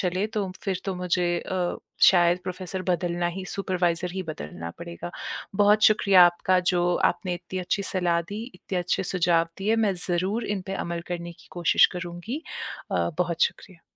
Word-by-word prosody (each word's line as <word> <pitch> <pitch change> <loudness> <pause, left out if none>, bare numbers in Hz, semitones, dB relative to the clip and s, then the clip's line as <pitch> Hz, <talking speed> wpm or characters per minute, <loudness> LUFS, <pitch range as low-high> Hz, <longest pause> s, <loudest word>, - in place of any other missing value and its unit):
चले 185 +2 0
तो 210 -3 -3
फिर 190 -2 -1
तो 195 -2 -2
मुझे 180 0 0
अ, 180 -2 -2 0.3
शायद 175 -1 +6
प्रोफेसर 185 0 -4
बदलना 175 0 0
ही 190 - -5
सुपरवाइजर 180 -2 -1
ही 190 0 -3
बदलना 85 - -7
पड़ेगा। 170 +1 -7 0.5
बहुत 210 +1 +4
शुक्रिया 200 -4 +7
आपका 175 +1 +2
जो 175 0 +2 0.2
आपने 180 -3 -4
इत्ती 175 +2 -6
अच्छी 185 +3 -1
सलाह 175 -2 +1
दी, 205 +6 -6
इत्ते 190 - -6
अच्छे 180 +1 0
सुझाव 170 -2 +3
दिए। 215 +4 +1
मैं 210 -4 +2
ज़रूर 190 +6 0
इन 205 -2 -2
पे 195 - -3
अमल 170 -2 -3
करने 170 -1 -4
की 175 +1 -20
कोशिश 175 -1 +4
करूँगी 175 - -5 0.5
अ, - - +1
बहुत 170 -2 0
शुक्रिया। 180 -4 -2
180 Hz, 170 wpm, -26 LUFS, 175-195 Hz, 0.5 s, शुक्रिया